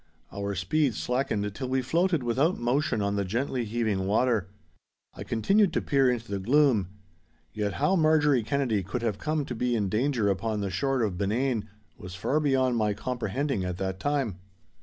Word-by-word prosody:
Our 100 0 -3
speed 115 - +1
slackened 110 -6 -1
till 130 +4 -5
we 130 0 0
floated 165 +2 +1
without 135 +9 +1
motion 120 -2 0
on 100 0 -1
the 100 - +1
gently 120 +5 -2
heaving 105 -4 -1
water. 110 -2 +2 0.7
I - - -7
continued 195 - +2
to - - +1
peer 135 -2 +3
into 115 -4 -3
the 100 - -1
gloom. 125 - +3 0.7
Yet 105 -2 -2
how 185 - +1
Marjorie 155 -5 +4
Kennedy 120 -3 0
could 100 +6 -4
have 110 -4 -1
come 155 -2 -1
to 125 - -5
be 120 +1 0
in 105 -4 0
danger 120 +1 +1
upon 105 +2 -1
the 100 -1 -2
shore 130 +6 0
of 95 -5 -2
Benane 115 +3 0 0.3
was 90 0 -8
far 135 +11 0
beyond 130 -4 +2
my 105 -2 +1
comprehending 125 0 -2
at 90 -1 -3
that 95 -1 -3
time. 135 -8 -1
120 Hz, 180 wpm, -27 LUFS, 100-135 Hz, 0.7 s, Marjorie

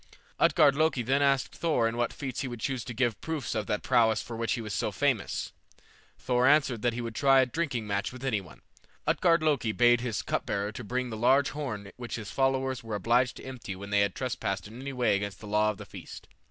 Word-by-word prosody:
Utgard 145 -3 +5
Loki 155 -4 +2
then 135 +4 +2
asked 140 -2 +2
Thor 155 -9 +1
in 115 - -3
what 120 0 0
feats 135 -4 -5
he 135 - -3
would 120 -2 -6
choose 130 0 -2
to 120 - -5
give 120 -2 0
proofs 160 -3 -3
of 110 -2 -2
that 105 - -1
prowess 115 -3 +3
for 115 - -6
which 115 0 -1
he 120 - -2
was 105 -2 -5
so - - -1
famous. - - -1 0.6
Thor 125 0 +2
answered 140 -6 +3
that 120 0 +1
he 120 - -3
would 115 -1 -5
try 135 +3 +5
a - - +3
drinking 125 -4 -2
match 100 -1 -1
with 130 +1 -8
any 110 -7 +1
one. 85 -6 -15 0.4
Utgard 165 -2 +3
Loki 140 -8 +2
bade 120 +1 +4
his 120 -4 -2
cup - - -1
bearer 100 +1 -1
bring 125 +3 -3
the 110 - -4
large 130 +5 +4
horn 110 -10 -5
which 120 -1 -5
his 110 -3 -6
followers 135 -1 0
were 115 -2 -4
obliged 120 +5 +2
to - - -10
empty 125 -7 -7
when 100 +2 -9
they 100 - +3
had 100 -2 +1
trespassed 100 -7 -3
in 115 +4 -10
any 140 +1 -5
way 125 -6 +2
against 100 0 -4
the - - -10
law 105 +1 +2
of 105 - -3
the - - -9
feast. - - -10
120 Hz, 235 wpm, -29 LUFS, 110-135 Hz, 0.6 s, Utgard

